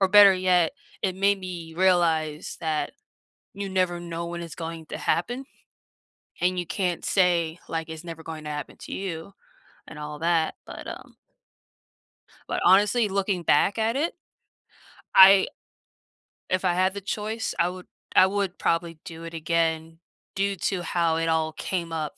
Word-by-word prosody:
or 195 Hz, -, +4 dB
better 205 Hz, 0 st, +9 dB
yet, 180 Hz, -3 st, +3 dB, 0.3 s
it 190 Hz, -2 st, 0 dB
made 200 Hz, +1 st, +3 dB
me 175 Hz, -3 st, -7 dB
realize 165 Hz, -4 st, +1 dB
that 160 Hz, -2 st, -1 dB, 0.6 s
you 200 Hz, 0 st, -4 dB
never 185 Hz, -2 st, 0 dB
know 170 Hz, 0 st, -5 dB
when 170 Hz, 0 st, -5 dB
it's 165 Hz, -2 st, -8 dB
going 165 Hz, -1 st, -6 dB
to -, -, -6 dB
happen, 245 Hz, +10 st, -1 dB, 1.0 s
and 180 Hz, +1 st, +2 dB
you 175 Hz, -, -2 dB
can't 180 Hz, -2 st, -2 dB
say, 170 Hz, -3 st, +2 dB
like, 165 Hz, 0 st, -3 dB
"It's 160 Hz, +1 st, -7 dB
never 165 Hz, -1 st, -8 dB
going 160 Hz, -1 st, -7 dB
to -, -, -4 dB
happen 150 Hz, 0 st, -6 dB
to -, -, -10 dB
you," 190 Hz, -1 st, -5 dB, 0.6 s
and -, -, -10 dB
all 150 Hz, 0 st, -6 dB
that, 165 Hz, -1 st, +1 dB
but, -, -, -9 dB
um -, -, -9 dB, 1.3 s
but -, -, -1 dB
honestly, 205 Hz, +4 st, +5 dB
looking 195 Hz, -2 st, -1 dB
back 150 Hz, +8 st, +3 dB
at 225 Hz, +1 st, +1 dB
it 305 Hz, +5 st, 0 dB, 1.0 s
I 190 Hz, 0 st, +9 dB, 1.0 s
if 185 Hz, 0 st, 0 dB
I 180 Hz, -2 st, +2 dB
had 185 Hz, +1 st, +2 dB
the 200 Hz, -, -6 dB
choice, 215 Hz, +3 st, -3 dB
I 170 Hz, -, +4 dB
would 180 Hz, 0 st, -9 dB, 0.3 s
I 185 Hz, -, +8 dB
would 195 Hz, -2 st, -2 dB
probably 165 Hz, -1 st, -1 dB
do 165 Hz, 0 st, -9 dB
it 165 Hz, 0 st, -8 dB
again, 165 Hz, 0 st, -1 dB, 0.4 s
due 200 Hz, 0 st, 0 dB
to 185 Hz, 0 st, -2 dB
how 170 Hz, -2 st, +1 dB
it 165 Hz, 0 st, 0 dB
all 160 Hz, -1 st, +1 dB
came 170 Hz, +1 st, -3 dB
up 155 Hz, -2 st, -4 dB
175 Hz, 160 wpm, -26 LUFS, 165-190 Hz, 1.3 s, better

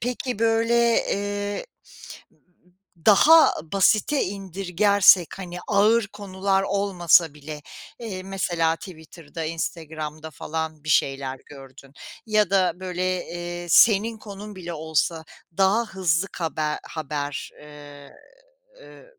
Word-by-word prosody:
peki, 250 Hz, -1 st, -3 dB
böyle, 230 Hz, +1 st, +2 dB, 0.4 s
eee, 205 Hz, -, -4 dB, 1.4 s
daha 310 Hz, +10 st, +7 dB, 0.2 s
basite 215 Hz, +8 st, +2 dB
indirgersek, 195 Hz, -1 st, +2 dB
hani, 180 Hz, -2 st, -7 dB
ağır 210 Hz, +2 st, +3 dB
konular 195 Hz, -1 st, -1 dB
olmasa 180 Hz, -6 st, +2 dB
bile, 150 Hz, 0 st, -9 dB, 0.4 s
eee, 200 Hz, -6 st, -6 dB
mesela 175 Hz, -4 st, -1 dB
Twitter'da, 165 Hz, -3 st, -10 dB
Instagram'da 160 Hz, -1 st, -5 dB
falan 155 Hz, 0 st, -5 dB
bir -, -, -9 dB
şeyler 135 Hz, -3 st, 0 dB
gördün 135 Hz, -1 st, -14 dB, 0.3 s
ya 215 Hz, -3 st, +2 dB
da, 190 Hz, -2 st, +3 dB
böyle, 185 Hz, 0 st, -2 dB
eee, 175 Hz, 0 st, -6 dB
senin 220 Hz, +4 st, +5 dB
konun 205 Hz, -1 st, -10 dB
bile 175 Hz, -2 st, -7 dB
olsa 160 Hz, +1 st, -1 dB, 0.3 s
daha 195 Hz, +5 st, +3 dB
hızlı 190 Hz, -2 st, 0 dB
kabe 155 Hz, -3 st, -2 dB, 0.2 s
haber, 145 Hz, -2 st, -4 dB
eee, 145 Hz, -1 st, -13 dB, 0.7 s
eee, -, -, -15 dB
180 Hz, 105 wpm, -24 LUFS, 160-200 Hz, 1.4 s, daha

